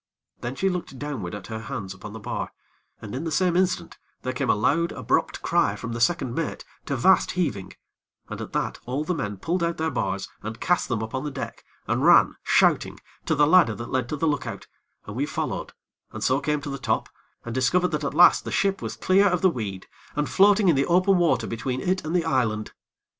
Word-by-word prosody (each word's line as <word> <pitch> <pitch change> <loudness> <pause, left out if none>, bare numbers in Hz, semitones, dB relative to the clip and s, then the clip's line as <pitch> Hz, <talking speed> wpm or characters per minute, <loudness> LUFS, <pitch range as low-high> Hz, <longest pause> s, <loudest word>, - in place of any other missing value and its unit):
Then 120 +2 -4
she 195 - 0
looked 180 -7 -3
downward 125 -11 -4
at 100 -2 -8
her 110 +1 -5
hands 110 -5 -5
upon 100 +2 -10
the 110 - -7
bar; 100 - -4 0.5
and, 105 - -7
in 135 +5 -3
the 165 - -3
same 180 +1 +2
instant, 185 0 0 0.2
there 130 - -2
came 125 - -2
a - - +5
loud, 165 +11 +1
abrupt - - -1
cry - - +2
from 115 - -6
the 120 - -4
second 130 -3 +1
mate, 165 +3 -3 0.2
to 140 - -1
vast 185 +10 +4
heaving, 100 - -2 0.5
and - - -6
at - - -7
that - - -2
all 135 +4 -1
the 180 - -1
men 105 - -3
pulled 170 - -1
out 170 0 0
their 160 0 -1
bars 100 0 -2
and 110 +1 -6
cast 180 - +1
them 115 -3 -1
upon 130 +5 -4
the 150 - -2
deck, 135 - -7 0.2
and - - 0
ran, - - +6
shouting, - - +2 0.3
to 155 - +2
the 150 0 +5
ladder 155 -8 +5
that 120 - -7
led 130 -2 -1
to - - -2
the 160 +2 0
look 145 -1 -1
out, - - -6 0.4
and 105 - -8
we 140 +4 -1
followed, - - -3 0.4
and - - -6
so 130 +1 +2
came 150 +1 -1
to 145 -1 -5
the 135 - -5
top, 125 - 0 0.4
and 120 - -5
discovered 175 +9 +2
that 150 -1 -2
at 140 - -2
last 175 - +7
the - - -5
ship 195 -1 +1
was 110 -1 -4
clear 190 - +4
of 180 -3 +1
the 185 - +5
weed, 100 - -5 0.3
and 150 0 -1
floating 205 +1 +5
in 170 - +5
the 135 +1 +1
open 185 +2 +4
water 130 -9 +2
between 125 +3 -3
it 185 +7 -1
and 155 +3 -3
the 170 -2 +2
island. 115 -8 0
140 Hz, 230 wpm, -25 LUFS, 115-170 Hz, 0.5 s, last